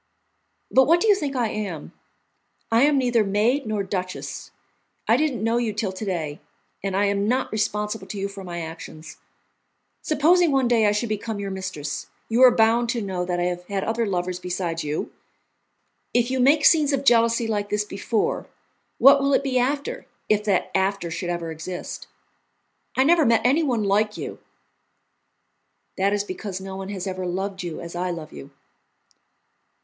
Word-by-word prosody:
"But 265 0 +6
what 335 +3 +5
do 445 - +1
you 420 - +7
think 295 -8 -3
I 240 -3 +1
am? 195 -9 -5 0.8
I 225 +1 +4
am 295 -1 +3
neither 245 -4 +2
maid 220 +7 +1
nor 215 -2 -1
duchess. 185 -1 -5 0.6
I - - +5
didn't 275 -8 0
know 230 +1 +2
you 235 -3 -1
till 210 -2 -2
to 190 +3 -7
day, 160 -7 -3 0.4
and 195 -1 -1
I 205 - +3
am 200 0 0
not 255 +3 0
responsible 210 0 -2
to 205 - -6
you 195 0 -2
for 200 -1 -9
my 175 -2 -5
actions. 160 -1 -9 0.8
Supposing 320 +3 +3
one 270 -2 +2
day 230 -3 +3
I - - +4
should 210 +3 -1
become 215 +1 -3
your 200 -1 -4
mistress, 185 -7 -5 0.2
you 230 +2 +2
are 255 - +10
bound 230 +1 +3
to 235 -1 -1
know 185 -2 -3
that 175 -1 -2
I - - +1
have 180 0 -2
had 195 -1 -2
other 225 0 -1
lovers 180 -1 -2
besides 180 -2 -3
you. 150 +1 -3 1.0
If 245 +1 +2
you 260 - 0
make 285 +4 +4
scenes 300 -3 +5
of 275 0 -1
jealousy 230 -1 +4
like 205 -2 -2
this 210 0 0
before, 210 +2 -2 0.5
what 275 +1 +7
will 275 0 +3
it - - +1
be 260 -2 +1
after, 280 +3 -2 0.2
if 210 -1 +2
that 195 -4 +1
after 190 -2 0
should 175 +2 -4
ever 170 -1 -3
exist? 165 +3 -6 0.9
I 260 - +5
never 330 +3 +5
met 230 -4 +4
anyone 260 -4 +2
like 210 +2 +1
you." - - -6 1.6
"That 195 +1 +1
is 205 0 0
because 190 -1 -6
no 190 0 -7
one 195 0 -6
has 195 -2 -4
ever 185 -1 -3
loved 190 +2 -3
you 175 -3 -5
as 170 0 -8
I 180 +1 -1
love 165 -3 -6
you." 70 -1 -10
210 Hz, 180 wpm, -24 LUFS, 185-245 Hz, 1.6 s, are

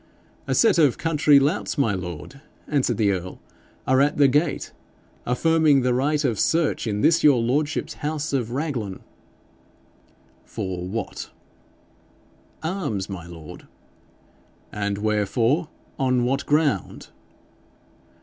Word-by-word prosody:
'A - - 0
set 225 -6 +4
of 145 -6 +4
country 150 -3 +4
louts, 150 +5 -1
my 115 -7 +2
lord,' 90 - -7 0.3
answered 130 -6 0
the 105 -3 +2
earl, 90 -1 -5 0.5
'are 130 +1 +3
at 145 +1 +2
the 145 -1 +6
gate, 145 +3 0 0.6
affirming 155 +2 +3
the 125 0 +2
right 145 +4 +1
of 115 -6 0
search 160 -7 +1
in 105 -1 -1
this 170 +6 +3
your 140 -5 +6
lordship's 145 +6 -1
house 150 0 -3
of 125 -5 0
Raglan.' 125 - -3 1.4
'For 90 -1 -5
what?' 100 +1 -5 1.3
'Arms, 145 - -3
my 85 -3 -7
lord.' 80 -3 -11 1.0
'And 100 -1 -2
wherefore? 115 - 0 0.3
On 130 -2 +2
what 130 +3 -1
ground?' 145 - 0
130 Hz, 120 wpm, -23 LUFS, 105-150 Hz, 1.4 s, the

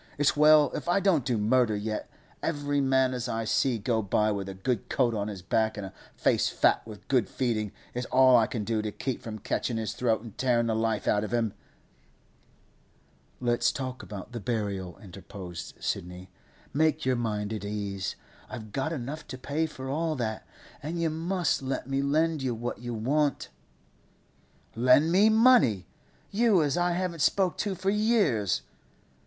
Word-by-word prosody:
It's 145 -1 +3
well 150 0 +6
if - - -4
I 175 - +4
don't 185 -8 +2
do 120 -2 0
murder 110 +1 +2
yet; 105 +1 -4 0.3
every 145 -2 -1
man 130 -1 +2
as 125 0 -3
I 115 0 -1
see 120 +2 +1
go 110 +1 0
by 105 +1 +1
with 100 -2 -3
a 95 - -7
good 110 +3 -2
coat 120 -3 +2
on 105 -1 -2
his 100 -4 -7
back 110 +3 0
and 100 - -4
a 95 - -9 0.2
face - - +2
fat - - +3
with 105 -2 -11
good 125 -7 +2
feeding, 110 -5 -1 0.2
it's 125 0 -3
all 130 0 +6
I 115 -2 +5
can 115 -5 -3
do 110 +1 -1
to 105 0 -3
keep 130 +4 -4
from 110 -1 -6
catchin' 115 +2 -2
his 110 -1 -2
throat 115 -1 0
an 115 - -9
tearin' 120 -3 +2
the 115 -1 0
life 110 -1 -1
out 105 - +2
of 110 - -5
him!' 115 -3 0 1.9
'Let's 120 -1 +2
talk 130 -2 -5
about 105 +2 -8
the 120 - -5
burial,' 100 -5 -3
interposed 95 -2 -9
Sidney. 90 +1 -4 0.4
'Make 155 +1 +2
your 130 -1 +2
mind 110 -3 -2
at 105 - -5
ease. 100 -2 -3 0.3
I've 110 -4 -8
got 135 +6 -2
enough 150 +1 -5
to 130 +2 -7
pay 150 +5 -1
for 130 -3 -8
all 155 +3 -1
that, 110 -5 -3 0.3
and 165 +4 -4
you 165 -1 +1
must 170 0 0
let 135 -1 -3
me 135 0 0
lend 155 +2 +1
you 130 -3 -1
what 120 +2 -4
you 120 -1 -5
want.' 140 +6 0 1.3
'Lend 125 +7 +4
me 200 +5 +5
money? 220 - +5 0.5
You 205 -5 +4
as 145 -2 0
I 175 0 +1
haven't 175 -2 -2
spoke 190 +2 +2
to 200 -2 -1
for 190 +2 0
years? 175 - +2
125 Hz, 180 wpm, -28 LUFS, 110-150 Hz, 1.9 s, well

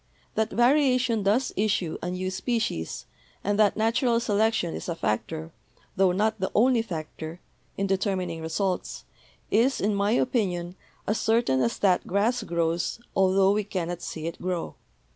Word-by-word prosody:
That 220 0 0
variation 255 -2 +3
does 210 +7 +1
issue 200 -5 0
a 175 - -3
new 185 +1 -3
species, 190 - -2 0.4
and 205 +1 0
that 210 -1 +4
natural 230 +2 +2
selection 220 -5 +1
is - - -5
a 170 - -1
factor, 160 +6 -2 0.4
tho 190 -1 +4
not 215 +4 0
the 190 - -1
only 240 +2 +4
factor, 160 -3 -6 0.4
in 195 - 0
determining 190 -3 -1
results, 180 +3 -2 0.5
is, 245 +6 +3
in 205 +2 +1
my 200 +2 +1
opinion, 180 -9 0 0.3
as 210 - 0
certain 220 - +2
as 120 -2 0
that 185 -3 +2
grass 220 +6 +1
grows 170 +1 -1 0.2
altho 190 0 +4
we 210 0 0
cannot 175 -3 -4
see 160 -1 -6
it 165 - -5
grow. 180 -2 -2
195 Hz, 150 wpm, -26 LUFS, 175-225 Hz, 0.5 s, that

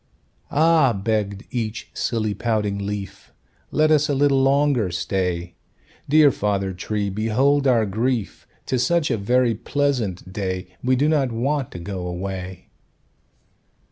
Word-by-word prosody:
"Ah!" 155 -4 +4
begged 100 0 -2
each 115 -2 -4
silly, 110 -3 -1
pouting 105 -2 -1
leaf, 100 -2 -6 0.4
"Let 155 0 +2
us 150 -1 +3
a 145 - +1
little 135 -1 +3
longer 135 -6 +2
stay; 90 -1 -2 0.6
Dear 150 -1 +6
Father 100 -4 -1
Tree, 100 +2 -3
behold 130 +8 +2
our 115 -4 +3
grief! 110 +2 -2 0.2
'Tis 125 -2 0
such 170 -5 +1
a 115 - +1
very 120 +3 +2
pleasant 115 -8 -2
day, 95 -2 -3
We 130 +1 +3
do 140 +4 +2
not 145 -5 +2
want 135 +4 -1
to - - -6
go 90 0 -5
away." 90 0 -6
110 Hz, 135 wpm, -22 LUFS, 100-135 Hz, 0.6 s, Dear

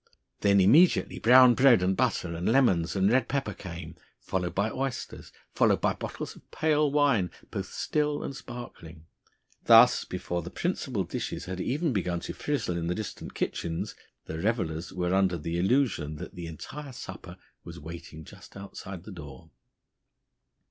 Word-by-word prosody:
Then 100 -1 +4
immediately 140 - +4
brown 125 +1 +7
bread 120 -6 +5
and 95 +1 +2
butter 105 -8 0
and 85 +6 -1
lemons 95 -11 +3
and 95 +2 +3
red 125 -1 +3
pepper 135 -7 -2
came, 85 -3 -8 0.2
followed 90 -2 -3
by 100 +3 +1
oysters, 135 -2 -5 0.2
followed - - +3
by - - +1
bottles - - -6
of - - -19
pale 150 -2 +1
wine, 140 -11 +3 0.2
both - - -5
still 150 -1 -1
and 135 - -5
sparkling. 120 -11 -10 0.6
Thus, - - +7
before 85 0 -4
the 85 - -7
principal 130 - -2
dishes 85 - -5
had 95 0 -4
even 145 - 0
begun 90 -4 -1
to - - -5
frizzle 120 -12 -2
in 85 -1 -2
the 90 - -1
distant 110 -2 -7
kitchens, 80 -1 -3 0.3
the 80 - -5
revellers 90 -5 -1
were 90 0 -1
under 95 -2 +2
the 85 +2 -3
illusion 95 - +1
that - - -8
the 85 -1 -7
entire 135 - -8
supper - - -9 0.3
was - - -9
waiting 80 0 -9
just - - -14
outside 95 -2 -8
the 105 - -10
door. 75 -7 -11
95 Hz, 160 wpm, -28 LUFS, 85-130 Hz, 0.6 s, brown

